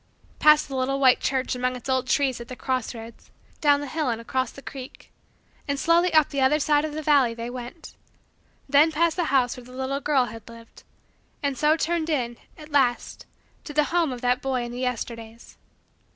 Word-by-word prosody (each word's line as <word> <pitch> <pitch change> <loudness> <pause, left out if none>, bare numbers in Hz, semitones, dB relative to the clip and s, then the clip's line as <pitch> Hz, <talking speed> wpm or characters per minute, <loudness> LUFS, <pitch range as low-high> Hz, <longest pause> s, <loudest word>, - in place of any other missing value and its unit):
Past 300 0 +5
the 275 - -6
little 265 +1 -1
white 260 -2 +5
church 260 -1 -1
among 250 0 -1
its 250 - -9
old 260 -1 0
trees 260 -2 +1
at 235 - -9
the 255 - -8
cross 255 -2 -3
roads; 225 0 -11 0.3
down 290 -2 +3
the 290 - -5
hill 305 0 -2
and 230 -1 -2
across 255 +2 -2
the 275 - -13
creek; 265 -2 -10 0.6
and 280 -1 -1
slowly 340 +3 +3
up 310 -2 +4
the 280 - -2
other 265 +3 +4
side 295 0 +2
of 310 -1 -4
the 310 - -4
valley 275 -6 +3
they 235 +1 -5
went: 250 +6 -9 0.7
then 290 +3 +5
past 325 +1 +1
the 350 - 0
house 260 -5 +2
where 250 - -11
the 250 - -15
little 265 +2 -3
girl 275 -3 +2
had 225 -1 -10
lived; 230 0 -14 0.6
and 280 -1 0
so 305 +3 +2
turned 330 0 -1
in, 240 -6 -1 0.2
at 305 0 -13
last, 260 -4 0 0.4
to 295 - -8
the 300 - +4
home 335 -5 +2
of 245 -1 -6
that 250 0 +1
boy 260 -2 -1
in 240 - -6
the 245 - -6
Yesterdays. 230 -2 -5
265 Hz, 210 wpm, -25 LUFS, 245-300 Hz, 0.7 s, Past